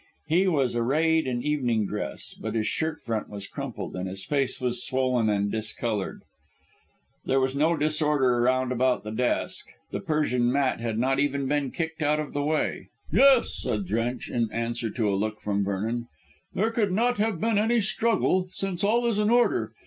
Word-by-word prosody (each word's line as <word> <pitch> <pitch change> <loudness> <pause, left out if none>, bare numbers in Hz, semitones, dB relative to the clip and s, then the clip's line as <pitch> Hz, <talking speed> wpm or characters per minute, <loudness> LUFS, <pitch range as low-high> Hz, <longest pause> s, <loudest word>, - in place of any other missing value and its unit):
He 180 +5 +2
was 135 -9 +1
arrayed 155 +6 +2
in 120 -1 -2
evening 125 -8 +1
dress, - - -5
but - - -5
his 110 -1 +1
shirt 160 -1 -2
front 115 -2 -3
was 100 -1 -6
crumpled, 125 -6 -6
and 95 +1 -3
his 95 +1 -6
face 140 -3 0
was 125 -1 -1
swollen 130 -4 +1
and 100 -1 +1
discoloured. 110 -1 -3 1.0
There 135 - +2
was 130 0 +1
no 160 +4 +2
disorder 150 -5 +2
round 130 +1 +2
about 125 -2 +1
the 105 - -6
desk; 120 +3 -1 0.2
the - - -2
Persian 125 -6 +1
mat 135 -2 +1
had 115 -2 -2
not 135 +3 +1
even 140 -1 0
been 145 -1 0
kicked 165 +1 -4
out 150 0 +2
of 150 - -4
the 145 - -1
way. 150 +1 -1 0.2
"Yes," 260 - +5
said 200 - -2
Drench 120 -3 -2
in 115 -2 -1
answer 115 0 -2
to 110 -1 -1
a 100 - +1
look 105 +2 -1
from 100 -1 -1
Vernon, 110 +5 -2 0.5
"there 220 +4 +1
could 215 -4 +1
not 235 +4 +1
have 210 -5 0
been 225 +1 +2
any 230 +3 +3
struggle, 200 -3 +1
since 190 -2 -3
all 235 +4 +3
is 230 -3 +1
in 210 0 +2
order. 240 +1 +2
135 Hz, 185 wpm, -26 LUFS, 115-165 Hz, 1.0 s, Yes